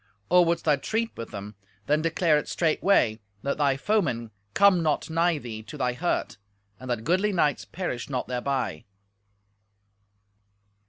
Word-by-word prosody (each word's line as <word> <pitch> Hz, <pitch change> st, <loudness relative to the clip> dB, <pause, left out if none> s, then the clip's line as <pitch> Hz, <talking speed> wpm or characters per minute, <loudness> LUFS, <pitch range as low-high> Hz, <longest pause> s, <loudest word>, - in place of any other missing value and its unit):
Or 180 Hz, 0 st, +7 dB
wouldst 170 Hz, 0 st, 0 dB
thou 150 Hz, -3 st, +4 dB
treat 225 Hz, +10 st, -2 dB
with 115 Hz, -, -7 dB
them, 100 Hz, +1 st, -7 dB, 0.3 s
then 150 Hz, +1 st, +2 dB
declare 165 Hz, 0 st, +2 dB
it -, -, -7 dB
straightway, 155 Hz, -, +2 dB, 0.2 s
that 140 Hz, -, -2 dB
thy 140 Hz, -2 st, +2 dB
foemen 135 Hz, -, 0 dB, 0.2 s
come 200 Hz, -3 st, +5 dB
not 155 Hz, 0 st, 0 dB
nigh 165 Hz, 0 st, +2 dB
thee 115 Hz, -6 st, -7 dB
to 110 Hz, +7 st, -10 dB
thy 125 Hz, -3 st, 0 dB
hurt, 170 Hz, -, -2 dB, 0.4 s
and 130 Hz, -, -9 dB
that 120 Hz, -2 st, -1 dB
goodly 185 Hz, -, +2 dB
knights 150 Hz, -6 st, +1 dB
perish 160 Hz, -11 st, -4 dB
not 130 Hz, -3 st, -2 dB
thereby." 125 Hz, -1 st, -2 dB
150 Hz, 150 wpm, -26 LUFS, 125-175 Hz, 0.4 s, Or